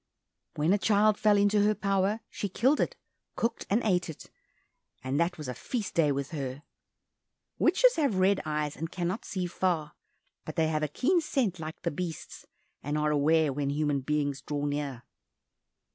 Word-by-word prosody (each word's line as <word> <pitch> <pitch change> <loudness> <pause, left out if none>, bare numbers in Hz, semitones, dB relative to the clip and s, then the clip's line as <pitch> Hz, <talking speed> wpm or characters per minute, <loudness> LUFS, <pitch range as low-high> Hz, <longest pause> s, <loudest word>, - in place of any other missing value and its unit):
When 155 +5 +2
a 205 - +2
child 215 +1 +4
fell 210 -3 +4
into 205 +1 +3
her 210 +1 +3
power, 200 +2 0
she 205 - -4
killed 260 +10 +2
it, - - 0 0.4
cooked 230 - -2
and 215 +5 +2
ate 180 -5 +1
it, 160 - -10 0.7
and 130 +3 -1
that 175 +1 +1
was 150 -3 -6
a 125 - -3
feast 225 - -4
day 155 -3 +3
with 140 +1 -3
her. 140 -2 -5 1.0
Witches - - +4
have 280 -10 +2
red 190 +1 +3
eyes, 150 -1 -2
and 165 +1 -4
cannot 180 +5 -3
see 185 -4 -3
far, 170 -4 -1 0.5
but 155 - -7
they 160 -2 +2
have 155 -1 0
a 150 - +1
keen 335 - +1
scent 245 - -1
like 155 0 -7
the 170 - 0
beasts, 165 +1 -6 0.3
and 145 +2 -2
are 150 0 +1
aware 150 0 +3
when 140 0 -1
human 145 -1 0
beings 145 0 -1
draw 145 0 -3
near. 145 -4 -3
165 Hz, 175 wpm, -29 LUFS, 150-205 Hz, 1.0 s, child